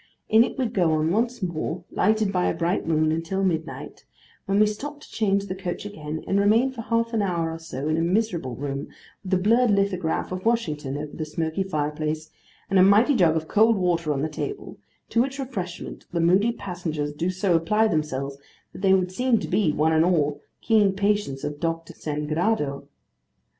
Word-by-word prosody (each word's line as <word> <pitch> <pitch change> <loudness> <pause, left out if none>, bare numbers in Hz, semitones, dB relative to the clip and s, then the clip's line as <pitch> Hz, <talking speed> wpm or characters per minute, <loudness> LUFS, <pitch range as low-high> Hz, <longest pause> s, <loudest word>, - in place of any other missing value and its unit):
In 220 +1 +7
it - - -4
we 260 - +1
go 180 -8 +1
on 155 +1 +1
once 235 +2 0
more, 170 0 -3
lighted 215 0 +2
by 180 -1 +1
a - - 0
bright 170 +3 -1
moon, 155 -1 +2
until 165 +4 -1
midnight; 165 -3 -3 0.4
when 195 +1 +2
we 215 - +6
stop 290 +8 -5
to - - -15
change 200 -2 +1
the 185 - -4
coach 185 0 -5
again, 155 -6 -6
and 195 - +1
remain 225 +6 +3
for 250 -3 -7
half 230 +1 0
an 220 - +1
hour 170 -4 -1
or 165 - -6
so 150 -3 -5
in 155 +1 +1
a - - +1
miserable 175 - 0
room, 140 +2 -4 0.4
with 190 - -7
a - - +3
blurred 230 +6 +3
lithograph 195 -6 0
of 185 0 -4
Washington 150 - -1
over 150 0 -6
the 160 - -3
smoky 160 +3 -2
fire 155 -6 -1
place, 155 +1 -4 0.4
and 195 - +3
a - - +8
mighty 210 +8 +5
jug 170 -7 +4
of 160 -1 -2
cold 225 +2 +4
water 170 -4 +1
on 140 -1 -1
the - - +1
table: 395 - -6 0.3
to 230 - +3
which 270 +2 -2
refreshment 200 -11 -6
the 170 - -1
moody 185 +7 +4
passengers 165 -8 -4
do 165 +4 -1
so 185 0 0
apply 210 +7 +2
themselves 140 -5 -2 0.3
that - - -10
they 190 -1 +5
would 185 -1 0
seem 250 +4 +2
to - - -4
be, 200 -8 +2
one 155 +2 +2
and 160 0 +4
all, 150 -5 +1 0.2
keen 210 -4 +3
patients 200 -9 0
of 150 0 -4
Dr. 165 0 -3
Sangrado. 150 0 -2
180 Hz, 200 wpm, -24 LUFS, 155-210 Hz, 0.4 s, a